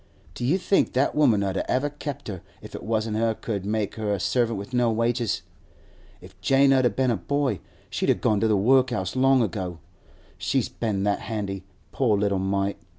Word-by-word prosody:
Do -, -, -6 dB
you 145 Hz, +10 st, +3 dB
think 195 Hz, +1 st, +1 dB
that 130 Hz, +3 st, +2 dB
woman 120 Hz, -9 st, +3 dB
'ud 95 Hz, -1 st, -1 dB
ever 135 Hz, +3 st, +1 dB
have 145 Hz, 0 st, -24 dB
kept 145 Hz, -3 st, -5 dB
her 95 Hz, -5 st, -5 dB, 0.2 s
if -, -, -12 dB
it -, -, -6 dB
wasn't 110 Hz, -1 st, -1 dB
she 115 Hz, 0 st, +1 dB
could 100 Hz, -4 st, -3 dB
make 105 Hz, -1 st, -1 dB
her 105 Hz, -2 st, -1 dB
a 100 Hz, -, 0 dB
servant 115 Hz, +2 st, +1 dB
with 100 Hz, +6 st, -8 dB
no 120 Hz, -2 st, +3 dB
wages? 115 Hz, +1 st, 0 dB, 0.8 s
If -, -, -16 dB
Jane 135 Hz, 0 st, +4 dB
'ud 125 Hz, -5 st, +2 dB
been 130 Hz, -2 st, +2 dB
a 115 Hz, -, 0 dB
boy, 140 Hz, -, -1 dB, 0.3 s
she'd -, -, -1 dB
a -, -, +5 dB
gone 105 Hz, -2 st, +1 dB
to 115 Hz, -, +2 dB
the 105 Hz, -2 st, +3 dB
workhouse 125 Hz, -3 st, +2 dB
long 130 Hz, -1 st, +4 dB
ago. 95 Hz, -4 st, -3 dB, 0.6 s
She's -, -, 0 dB
been 105 Hz, -4 st, -2 dB
that 100 Hz, 0 st, +1 dB
handy, 100 Hz, -4 st, -4 dB, 0.3 s
poor 115 Hz, -6 st, +2 dB
little 100 Hz, -1 st, +1 dB
mite! 100 Hz, +1 st, -1 dB
110 Hz, 200 wpm, -25 LUFS, 100-130 Hz, 0.8 s, a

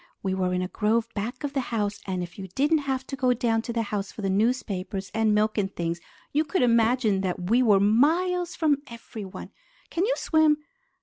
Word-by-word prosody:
We 190 Hz, -1 st, 0 dB
were 185 Hz, -1 st, 0 dB
in 180 Hz, 0 st, 0 dB
a -, -, -2 dB
grove 220 Hz, +3 st, 0 dB
back 225 Hz, +8 st, -4 dB
of 285 Hz, -1 st, -3 dB
the 275 Hz, -, 0 dB
house, 210 Hz, -4 st, -2 dB
and 185 Hz, -2 st, -2 dB
if 175 Hz, +2 st, -9 dB
you 190 Hz, -, -6 dB
didn't 300 Hz, +3 st, +3 dB
have 265 Hz, 0 st, -1 dB
to 275 Hz, -, -5 dB
go 255 Hz, -2 st, +2 dB
down 225 Hz, -1 st, +1 dB
to 235 Hz, -, -5 dB
the 230 Hz, -1 st, 0 dB
house 205 Hz, -2 st, -3 dB
for 215 Hz, -, -8 dB
the 195 Hz, -, +1 dB
newspapers 195 Hz, -3 st, -1 dB
and 220 Hz, -1 st, +2 dB
milk 215 Hz, +1 st, +2 dB
and 195 Hz, -1 st, -1 dB
things, 170 Hz, 0 st, -2 dB, 0.3 s
you 300 Hz, +2 st, +3 dB
could 310 Hz, 0 st, 0 dB
imagine 230 Hz, -3 st, +3 dB
that 180 Hz, 0 st, -3 dB
we 245 Hz, +2 st, +5 dB
were 210 Hz, -5 st, +5 dB
miles 335 Hz, -, +2 dB
from 295 Hz, -4 st, +2 dB
everyone. 220 Hz, -5 st, -9 dB, 0.4 s
Can 345 Hz, -, 0 dB
you -, -, +2 dB
swim?" 315 Hz, -2 st, +3 dB
225 Hz, 210 wpm, -26 LUFS, 195-265 Hz, 0.4 s, we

